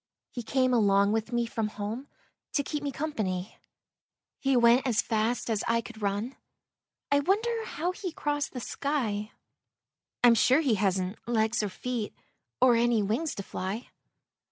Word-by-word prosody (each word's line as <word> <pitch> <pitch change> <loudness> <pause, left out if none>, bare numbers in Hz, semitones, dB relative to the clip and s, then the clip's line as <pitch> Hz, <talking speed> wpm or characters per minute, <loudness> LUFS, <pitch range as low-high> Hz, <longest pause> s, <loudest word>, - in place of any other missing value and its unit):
He 245 - -5
came 255 +2 +1
along 200 -3 +4
with 225 +1 -1
me 240 0 +1
from 225 -1 -2
home 215 +6 -5 0.5
To 285 - +2
keep 295 +1 -3
me 285 -1 -2
company. 215 -10 -3 0.8
He 270 -2 +2
went 240 +3 +5
as 225 -4 +1
fast 225 +2 0
as 220 -3 0
I 230 0 +3
could 230 -1 -11
run; 205 +6 -2 0.7
I 285 - +5
wonder 445 +8 0
how 350 -2 -2
he 370 -1 -5
crossed 290 -2 -2
the 250 - -5
sky? 225 -8 -2 0.9
I'm 240 -1 +8
sure 260 +5 +4
he 270 -7 +2
hasn't 190 -1 0
legs 225 -1 +1
and 205 -2 -2
feet 240 0 -4 0.4
Or 250 -1 +6
any 235 -2 +3
wings 235 +11 -1
to 200 - -5
fly. 195 +6 -5
235 Hz, 155 wpm, -28 LUFS, 215-275 Hz, 0.9 s, I'm